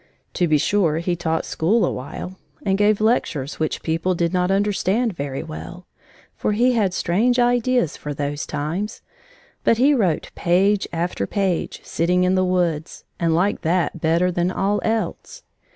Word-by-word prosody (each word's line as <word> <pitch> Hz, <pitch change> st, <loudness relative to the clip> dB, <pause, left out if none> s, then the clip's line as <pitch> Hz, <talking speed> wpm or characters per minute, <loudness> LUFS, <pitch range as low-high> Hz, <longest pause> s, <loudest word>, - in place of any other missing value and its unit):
To 175 Hz, -, +1 dB
be 155 Hz, -1 st, +4 dB
sure 165 Hz, -1 st, +1 dB
he 175 Hz, +1 st, -1 dB
taught 160 Hz, -1 st, -1 dB
school 210 Hz, +8 st, +1 dB
a -, -, 0 dB
while 180 Hz, +8 st, -7 dB, 0.3 s
and 195 Hz, -1 st, +2 dB
gave 205 Hz, +1 st, +3 dB
lectures 160 Hz, -, 0 dB
which 155 Hz, -1 st, -2 dB
people 165 Hz, +3 st, 0 dB
did 170 Hz, +1 st, 0 dB
not 180 Hz, 0 st, +1 dB
understand 205 Hz, +3 st, +1 dB
very 140 Hz, -3 st, -4 dB
well, 80 Hz, +1 st, -9 dB, 0.5 s
for 210 Hz, -, -1 dB
he 245 Hz, +4 st, +3 dB
had 205 Hz, -7 st, +1 dB
strange 225 Hz, +8 st, +1 dB
ideas 245 Hz, -, +2 dB
for 150 Hz, -, -6 dB
those 145 Hz, +1 st, -3 dB
times, 155 Hz, +8 st, -4 dB, 0.6 s
but 230 Hz, -, +3 dB
he 275 Hz, +5 st, +4 dB
wrote 190 Hz, -, 0 dB
page 195 Hz, +4 st, +2 dB
after 170 Hz, -, -2 dB
page, 190 Hz, -4 st, -1 dB
sitting 180 Hz, +2 st, +1 dB
in 180 Hz, +1 st, +2 dB
the 185 Hz, 0 st, +2 dB
woods, 175 Hz, -4 st, -1 dB, 0.2 s
and 165 Hz, -1 st, +2 dB
liked 190 Hz, +5 st, +1 dB
that 170 Hz, 0 st, 0 dB
better 170 Hz, +3 st, +2 dB
than 175 Hz, 0 st, 0 dB
all 200 Hz, +2 st, 0 dB
else. 225 Hz, -, -3 dB
180 Hz, 165 wpm, -22 LUFS, 160-205 Hz, 0.6 s, be